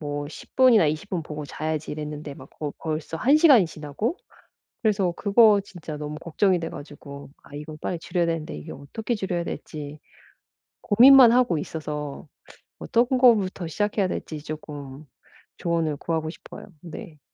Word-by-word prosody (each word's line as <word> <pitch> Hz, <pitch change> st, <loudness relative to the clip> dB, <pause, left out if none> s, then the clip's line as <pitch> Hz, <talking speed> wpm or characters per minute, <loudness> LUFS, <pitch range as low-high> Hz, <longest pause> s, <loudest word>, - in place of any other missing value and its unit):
뭐 145 Hz, -1 st, -4 dB
'10 -, -, -13 dB
분이나 245 Hz, -9 st, +6 dB
20 155 Hz, +7 st, -3 dB
분 180 Hz, -3 st, -2 dB
보고 150 Hz, -1 st, -7 dB
자야지.' 155 Hz, +1 st, -4 dB
이랬는데 150 Hz, -1 st, -6 dB
막 -, -, -13 dB
거 150 Hz, -2 st, -5 dB
벌써 155 Hz, 0 st, -4 dB
1 270 Hz, -, +4 dB
시간이 280 Hz, -, +6 dB
지나고 160 Hz, -, -4 dB, 0.7 s
그래서 200 Hz, -5 st, +2 dB
그거 205 Hz, 0 st, +5 dB
진짜 165 Hz, -6 st, -8 dB
너무 150 Hz, 0 st, -5 dB
걱정이 180 Hz, +3 st, +1 dB
돼 165 Hz, -, -3 dB
가지고 140 Hz, -1 st, -10 dB
아 -, -, -17 dB
이건 155 Hz, +1 st, -8 dB
빨리 175 Hz, -, -3 dB
줄여야 175 Hz, 0 st, -1 dB
되는데 165 Hz, -2 st, -3 dB
이게 75 Hz, -, -9 dB
어떻게 215 Hz, -, -4 dB
줄여야 185 Hz, -4 st, -2 dB
될지 150 Hz, -3 st, -7 dB, 0.8 s
고민만 250 Hz, +2 st, +8 dB
하고 240 Hz, -9 st, +3 dB
있어서 150 Hz, -1 st, -5 dB, 0.5 s
어떤 235 Hz, -1 st, +2 dB
거부터 200 Hz, -8 st, +3 dB
시작해야 205 Hz, +3 st, 0 dB
될지 155 Hz, -4 st, -5 dB
쪼끔 150 Hz, -2 st, -8 dB, 0.5 s
조언을 165 Hz, -3 st, -1 dB
구하고 160 Hz, +1 st, -2 dB
싶어요. -, -, -12 dB, 0.2 s
네. 165 Hz, -1 st, -10 dB
160 Hz, 320 characters per minute, -25 LUFS, 150-205 Hz, 0.8 s, 고민만